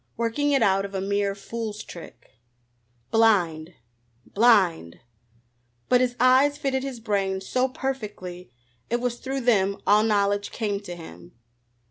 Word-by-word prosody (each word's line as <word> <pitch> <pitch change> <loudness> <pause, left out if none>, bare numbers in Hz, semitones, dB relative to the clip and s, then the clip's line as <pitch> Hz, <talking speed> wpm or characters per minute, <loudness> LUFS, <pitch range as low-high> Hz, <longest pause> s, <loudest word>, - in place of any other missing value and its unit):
Working 235 +6 0
it 275 - +3
out 195 0 +2
of 200 0 -7
a - - -1
mere 200 +1 -1
fool's 215 +1 -6
trick! 165 -8 -12 0.8
Blind? 180 -8 +2 0.5
Blind? 190 - +2 0.9
But 250 0 +4
his 245 -1 0
eyes 260 +4 +4
fitted 270 -2 -1
his 265 -3 -6
brain 195 -3 -1
so 250 +7 0
perfectly 210 - -6 0.4
it 240 - 0
was 245 -1 -2
through 270 0 -4
them 200 -5 +2
all 210 +1 +5
knowledge 205 -2 +1
came 205 -3 -2
to 180 -4 -8
him. 85 - -12
210 Hz, 135 wpm, -25 LUFS, 190-245 Hz, 0.9 s, all